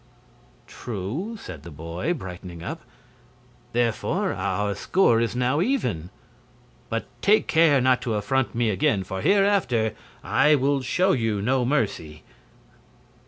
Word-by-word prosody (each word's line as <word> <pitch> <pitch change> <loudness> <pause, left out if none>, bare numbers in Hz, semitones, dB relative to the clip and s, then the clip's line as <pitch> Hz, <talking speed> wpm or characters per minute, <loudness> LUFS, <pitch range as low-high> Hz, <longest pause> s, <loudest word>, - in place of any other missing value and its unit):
"True," 125 - -5
said 80 - -9
the 85 - -10
boy, 85 - -3
brightening 90 - -8
up; - - -5 0.9
"therefore 115 -2 0
our 100 +2 -1
score 120 - +2
is 115 0 -1
now 125 +5 +1
even. 125 - -1 0.8
But - - -2 0.2
take 210 +2 +4
care 160 -4 +4
not 130 0 +3
to 115 -4 -2
affront 125 +5 0
me 115 -2 +1
again, 95 0 +1
for 95 +1 -5
hereafter 195 - +2 0.3
I 150 +1 +4
will 140 0 +1
show 180 +9 +1
you 115 - 0
no 125 +4 +1
mercy!" 95 - -2
120 Hz, 125 wpm, -24 LUFS, 95-145 Hz, 0.9 s, take